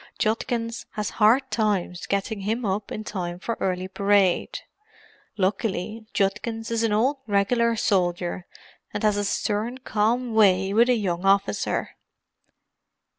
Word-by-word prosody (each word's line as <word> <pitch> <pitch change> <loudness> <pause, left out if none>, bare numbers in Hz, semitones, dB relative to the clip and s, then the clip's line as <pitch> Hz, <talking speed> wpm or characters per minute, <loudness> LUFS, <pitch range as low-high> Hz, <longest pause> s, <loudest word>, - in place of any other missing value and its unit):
Judkins 230 +1 -1
has 210 -1 -3
hard 255 +5 +4
times 200 -5 -1
getting 200 +2 -1
him 220 +4 -2
up 200 +1 -2
in 215 - -4
time 175 -5 -4
for 230 +5 -3
early 185 -1 -1
parade. 200 -1 +1 0.8
Luckily 210 +2 -2
Judkins 225 +3 -1
is 230 -1 0
an 225 -2 +1
old 250 +7 +2
regular 230 +3 +2
soldier, 180 -3 0 0.5
and - - -3
has 210 -1 +3
a 205 - 0
stern, 215 +4 -1
calm 235 0 0
way 195 -3 +4
with 235 +3 +4
a 250 - +5
young 180 -5 -2
officer." 195 +1 +1
210 Hz, 130 wpm, -24 LUFS, 195-230 Hz, 0.8 s, a